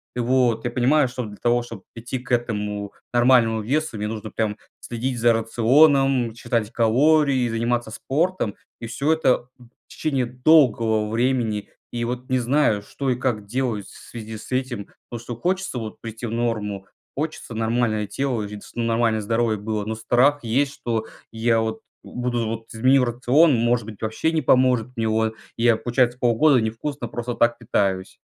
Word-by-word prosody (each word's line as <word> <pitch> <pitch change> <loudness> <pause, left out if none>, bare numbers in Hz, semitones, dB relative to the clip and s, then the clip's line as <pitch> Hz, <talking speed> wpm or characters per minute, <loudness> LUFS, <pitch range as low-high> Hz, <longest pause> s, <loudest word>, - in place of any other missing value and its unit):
Вот, 120 -2 +1
я 120 - -1
понимаю, 130 +3 +3
что 125 0 -5
для 105 -1 -10
того, 120 0 +2
чтоб 115 -5 -10
прийти 120 +3 -5
к 125 0 -12
этому 105 -4 -2 0.2
нормальному 120 -2 +4
весу, 145 +3 -1
мне 105 0 -2
нужно 110 0 -6
прям 110 -2 -2 0.2
следить 120 +1 -3
за 120 0 +4
рационом, 125 +2 +3
считать 115 -2 -2
калории, 130 +3 +3
заниматься 115 0 -1
спортом. 150 - -1 0.3
И 115 - -5
всё 140 +7 +1
это 130 -6 +1
в 120 -2 -17 0.2
течение 135 -5 -1
долгого 120 -5 +3
времени. 115 -3 0 0.2
И 120 0 -2
вот 125 +1 -5
не 130 - +2
знаю, 120 -4 +2
что 135 +6 -4
и - - +1
как 120 -4 -2
делать 115 -3 -2
в - - -14
связи 110 -1 -7
с 110 - -12
этим, 125 -5 -2 0.2
потому 120 - -6
что 120 -1 -6
хочется 185 +1 -1
вот 110 -2 -7
прийти 115 +1 -7
в 115 - -4
норму. 105 -4 -2 0.3
Хочется 150 -4 -4
нормальное 110 -1 0
тело 125 +1 -2
и 105 0 -7
ц 110 - -10
нормальное 115 -1 +1
здоровье 115 0 0
было. 105 0 -3
Но 110 +1 -3
страх 125 +6 +2
есть, 135 +5 +1
что 115 -4 -3 0.3
я 115 0 +1
вот 110 0 -3 0.2
буду 120 -1 -2
вот- 115 0 -5
изменю 130 +3 +4
рацион, 130 +5 +3
может 120 0 +1
быть, 110 -2 -10
вообще 110 +9 -1
не 160 -1 0
поможет 125 -3 +3
мне, 115 -2 -1
вот. 110 0 0 0.2
И 115 - -2
я, 115 -2 +5
получается, 120 0 +1
полгода 125 +4 +4
невкусно 120 +4 -4
просто 120 +1 -4
так 120 0 +2
питаюсь. 95 -5 -1
120 Hz, 170 wpm, -23 LUFS, 110-130 Hz, 0.3 s, я